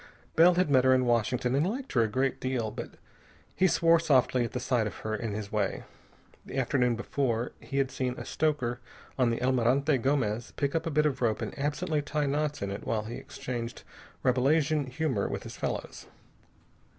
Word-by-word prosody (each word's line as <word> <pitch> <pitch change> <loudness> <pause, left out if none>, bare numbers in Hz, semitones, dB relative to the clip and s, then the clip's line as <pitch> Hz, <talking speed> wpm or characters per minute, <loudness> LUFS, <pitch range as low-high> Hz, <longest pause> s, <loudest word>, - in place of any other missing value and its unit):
Bell 175 +2 +6
had 180 -4 +2
met 130 -2 +5
her 130 0 +5
in 130 0 +2
Washington 120 +1 +1
and 145 +7 +2
liked 260 +5 -5
her 120 - +4
a 110 - +3
great 130 +5 0
deal, 125 -4 -1
but - - -7 0.6
he 185 - +4
swore 165 -1 +4
softly 130 -5 +3
at 120 +2 -3
sight 125 -3 +1
of 100 - -6
her 110 0 -1
in 110 0 -3
his 105 -1 -5
way. 105 -3 -1 0.6
The - - -7
afternoon 125 -2 +2
before, 120 0 -1
he 140 - -5
had 135 -2 +1
seen 125 -1 -2
a - - -6
stoker 135 -6 0 0.4
on 125 -2 +4
the 115 +1 -2
Almirante 130 +3 +2
Gomez 120 -4 0
pick 140 -1 -1
up 165 0 -1
a - - +1
bit 150 0 +2
of 135 -4 0
rope 115 -3 +1
and - - -4
absently 150 +2 0
tie 150 0 -1
knots 145 -2 -1
in 100 - -2
it 100 - -5
while 110 -2 -1
he 115 +2 -6
exchanged 120 -1 -6 0.4
Rabelasian 140 +3 +2
humor 130 -5 -1
with - - -4
his - - -8
fellows. - - -4
130 Hz, 195 wpm, -29 LUFS, 120-145 Hz, 0.6 s, Bell